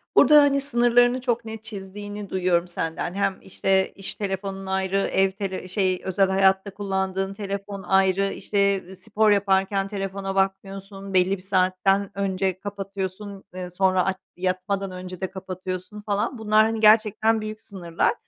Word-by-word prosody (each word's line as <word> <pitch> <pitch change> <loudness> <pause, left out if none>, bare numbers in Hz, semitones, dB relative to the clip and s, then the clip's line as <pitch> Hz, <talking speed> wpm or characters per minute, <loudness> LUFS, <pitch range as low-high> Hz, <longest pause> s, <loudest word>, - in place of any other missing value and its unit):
Burada, 300 -1 +8
hani, 280 -1 +3
sınırlarını 245 -1 +3
çok 240 -2 -1
net 220 0 -7
çizdiğini 205 0 -7
duyuyorum 180 -2 +1
senden. 165 0 -3
Hem, 195 -1 0
işte, 190 0 0
iş 195 - -5
telefonun 195 -1 -4
ayrı, 190 0 0
ev 195 -1 +2
tele 190 -2 -5
şey, 185 -1 0
özel 190 +1 +2
hayatta 190 +1 +2
kullandığın 195 -1 -2
telefon 200 -1 -5
ayrı, 195 +1 +2
işte, 200 -1 0
ııı, 190 +1 -11
spor 215 +2 +1
yaparken 195 0 +2
telefona 195 -1 -4
bakmıyorsun, 195 0 -3
belli 185 +1 +3
bir - - -12
saatten 190 +1 +1
önce 190 -1 -1
kapatıyorsun, 195 0 -6
ııı, 180 -1 -6
sonra 185 0 +2
aç 190 -1 -1 0.2
yatmadan 185 +1 -2
önce 185 0 -8
de 190 - -3
kapatıyorsun 185 +2 -6
falan, 205 +4 -1
bunlar, 215 0 +4
hani, 225 0 -1
gerçekten 220 0 +4
büyük 215 0 -6
sınırlar. 175 -6 -1
195 Hz, 150 wpm, -24 LUFS, 190-205 Hz, 0.2 s, Burada